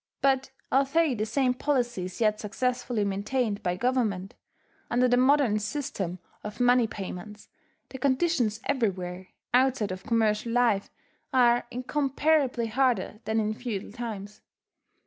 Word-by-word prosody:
But 270 -1 +2 0.2
although 275 +3 +3
the 215 -2 -2
same 250 +2 +2
policy 245 -7 -1
is 185 - -8
yet 215 -2 +2
successfully 245 0 -1
maintained 205 +2 -1
by 180 -1 -1
Government, 210 -4 0 0.6
under 250 +1 +3
the 245 - +4
modern 255 -4 +4
system 210 - -3 0.3
of 210 +2 -7
money 245 -1 +4
payments, 210 +1 -8 0.4
the 265 - -8
conditions 260 -5 +1
everywhere, 185 -7 -1 0.3
outside 250 -5 +3
of 185 0 -5
commercial 225 0 +1
life, 235 -5 +2 0.4
are 240 -2 +4
incomparably 275 0 +1
harder 225 -3 0
than 220 0 +1
in 215 0 0
feudal 220 -5 -5
times. 210 -3 -7
235 Hz, 125 wpm, -27 LUFS, 210-260 Hz, 0.6 s, the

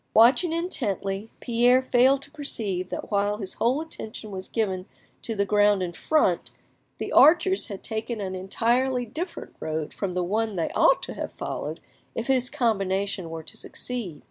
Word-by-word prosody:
Watching 245 +10 +6
intently; 215 - -2
Pierre 245 +2 +4
failed 265 +2 +5
to 285 - -10
perceive 210 -11 -3
that - - -5
while 205 0 +1
his 195 -3 -5
whole 250 +5 +3
attention 220 -9 -7
was 185 -1 -6
given 190 -5 -1 0.3
to 225 - -3
the 200 -1 +1
ground 205 -1 +4
in 175 -1 -3
front, 190 - +1 0.5
the - - -4
archers 350 +5 +5
had 200 -2 -7
taken 220 0 -3
an 190 -2 -3
entirely 240 +7 +1
different 335 - -6
road 155 -1 -3
from 195 -3 -3
the 180 0 0
one 215 +3 0
they 165 -3 -1
ought - - +4
to - - -5
have - - -5
followed - - -5 0.3
if 230 - -2
his 255 -1 +2
combination 195 - 0
were 160 0 -6
to - - -7
succeed. 225 -11 -5
220 Hz, 170 wpm, -26 LUFS, 190-255 Hz, 0.5 s, Watching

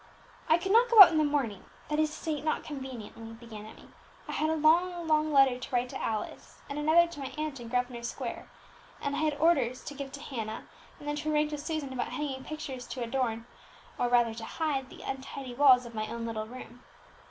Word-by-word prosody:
"I 320 - +6
could 380 +3 -3
not 470 +3 +5
go 465 -2 +5
out 345 - +5
in 315 - +2
the - - +4
morning, 275 -10 -1 0.2
that 300 0 -1
is 310 0 +3
to 305 - -9
say, 310 -3 -3
not 310 - -1
conveniently," 250 -6 -8
began 225 -2 -10
Emmie. - - -14 0.4
"I - - -5
had 310 - 0
a 320 - +1
long, 340 +3 +3
long 310 0 +2
letter 270 -3 +5
to 255 - -7
write 250 0 0
to - - -6
Alice, 220 -1 -4
and 285 +1 -4
another 315 +3 +5
to 340 -3 -9
my 270 - -5
aunt 305 -3 -3
in 235 - -8
Grosvenor 245 0 -1
Square; 235 - -5 0.5
and 285 0 -2
I - - -1
had 310 -2 +1
orders 280 -6 +2
to 290 - -7
give 280 -1 -7
to 285 - -7
Hannah, 225 -6 -5 0.3
and 295 - -11
then 295 0 -1
to 310 +1 -2
arrange 300 0 +2
with 295 -1 -4
Susan 300 -3 -3
about 250 -1 -3
hanging 270 -3 -3
pictures 275 -5 -6
to 250 -1 -4
adorn, 230 -2 -1 0.5
or 245 - +1
rather 240 -2 +3
to 225 0 -8
hide 270 0 -2
the - - -12
untidy 270 -1 -6
walls 255 -2 +6
of 235 - -10
my 215 -1 -3
own 235 0 -5
little 220 -1 -4
room." 245 0 -11
270 Hz, 225 wpm, -30 LUFS, 240-310 Hz, 0.5 s, I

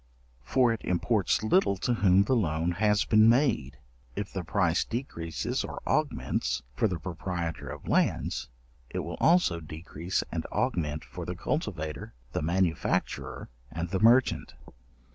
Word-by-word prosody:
For 125 - +3
it 115 - -6
imports 100 +3 +1
little 110 - +3
to 120 +6 0
whom 100 -3 +4
the 130 +6 +1
loan 85 -5 +1
has 105 +3 +2
been 110 0 +6
made: 115 - +2 0.4
if 100 - -4
the 95 - -3
price 85 0 +1
decreases 85 - -3
or - - -6
augments 60 - 0
for 110 - +2
the 90 -4 -2
proprietor 85 0 -4
of - - -8
lands, - - 0 0.4
it - - -5
will 85 +2 -6
also 170 - +4
decrease 80 +3 -4
and - - -2
augment 75 -3 -1
for - - -7
the 90 - -4
cultivator, 80 - -3 0.2
the - - -2
manufacturer, 85 +1 -1 0.2
and 85 +4 -4
the 95 - 0
merchant. 120 +4 +4
90 Hz, 145 wpm, -28 LUFS, 80-110 Hz, 0.4 s, been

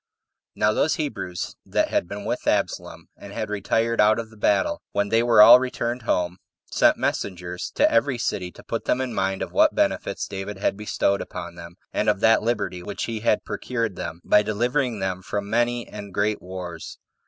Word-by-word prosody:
1. - - -18
Now 105 - +3
those 155 - +2
Hebrews 95 - -4
that - - 0
had - - 0
been 100 +2 -7
With - - -3
Absalom, - - -1
and 100 0 -11
had 110 0 -4
retired 115 +3 +1
out 105 +1 +5
of 115 -1 -5
the - - -15
battle, 105 -2 +1
when 100 0 0
they 115 +2 +3
were 115 -3 +7
all 120 +3 +10
returned 125 -1 -3
home, 90 -5 0 0.3
sent - - +4
messengers 90 -2 -3
to - - +5
every 120 +2 +2
city 90 -6 -2
to - - -14
put 115 - -4
them 125 - +1
in 130 -2 -2
mind 95 0 -1
of - - -6
what - - +4
benefits - - 0
David 95 +1 -6
had 100 - 0
bestowed 100 -1 0
upon 85 0 -7
them, 85 0 -11 0.2
and - - +1
of - - +1
that 115 0 +5
liberty 105 -6 -2
which 100 +3 -5
he 115 -2 -3
had 105 -1 +1
procured 115 -6 -3
them, 85 0 -6
by 105 - +5
delivering 120 +4 0
them 95 -1 -2
from 100 +2 -4
many 120 +2 0
and 100 -2 -9
great 105 +1 0
wars. 90 -3 -7
105 Hz, 200 wpm, -24 LUFS, 95-115 Hz, 0.3 s, all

